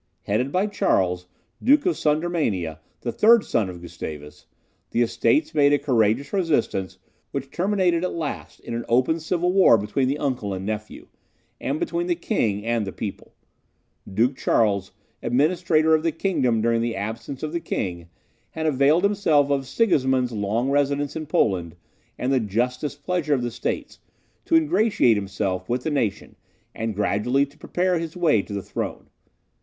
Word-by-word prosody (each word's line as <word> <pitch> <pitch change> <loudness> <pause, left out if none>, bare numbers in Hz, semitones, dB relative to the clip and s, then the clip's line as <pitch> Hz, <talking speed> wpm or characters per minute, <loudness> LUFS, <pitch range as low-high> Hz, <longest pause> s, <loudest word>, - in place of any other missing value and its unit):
Headed 125 +7 0
by 185 +5 +2
Charles, 90 - 0 0.3
Duke 290 +4 +4
of 360 - +2
Sudermania, 150 - 0 0.2
the 120 - -2
third 225 - +5
son 105 -5 0
of 90 -1 -9
Gustavus, 75 -3 -8 0.4
the 120 - +2
Estates 300 - +1
made 145 -1 +4
a - - +5
courageous 120 0 +1
resistance, 120 - 0 0.3
which 135 0 -5
terminated, 180 -2 +1
at 180 - -2
last, 155 -4 -5
in - - -7
an 115 0 -2
open 130 +7 +2
civil 175 +2 0
war 190 -11 +6
between 120 +6 -1
the 140 +3 0
uncle 125 -9 -2
and 95 +1 -6
nephew, 105 0 -5 0.5
and 140 +3 -2
between 170 +1 -2
the 175 - +1
King 105 - -1
and 115 -3 0
the - - -3
people. 100 0 -7 0.8
Duke 120 +7 +2
Charles, 100 -6 +1 0.3
administrator 160 +3 +2
of 155 - +4
the 165 0 0
kingdom 130 - 0
during 115 0 +2
the 115 0 -1
absence 110 +7 -5
of 155 - -2
the 170 - 0
king, 85 - -4 0.4
had 160 - -4
availed 150 +3 +3
himself 160 -9 +3
of 135 -2 0
Sigismund's 130 - +2
long 110 +5 -1
residence 145 0 0
in 155 -1 -5
Poland, 90 - 0 0.4
and 130 +2 0
the 130 - +3
just 120 +4 -1
displeasure 150 +1 -1
of 125 - -2
the 120 - -2
states, 120 +1 -4 0.5
to 330 - +2
ingratiate 230 - +3
himself 95 -2 -3
with 125 +1 -1
the 160 - -1
nation, 115 -9 -2 0.4
and 110 -1 -3
gradually 105 +7 +1
to 140 +1 -21
prepare 180 +2 0
his 165 +1 -6
way 155 - +3
to 100 - -9
the 100 -1 -3
throne. - - -5
135 Hz, 165 wpm, -24 LUFS, 110-160 Hz, 0.8 s, war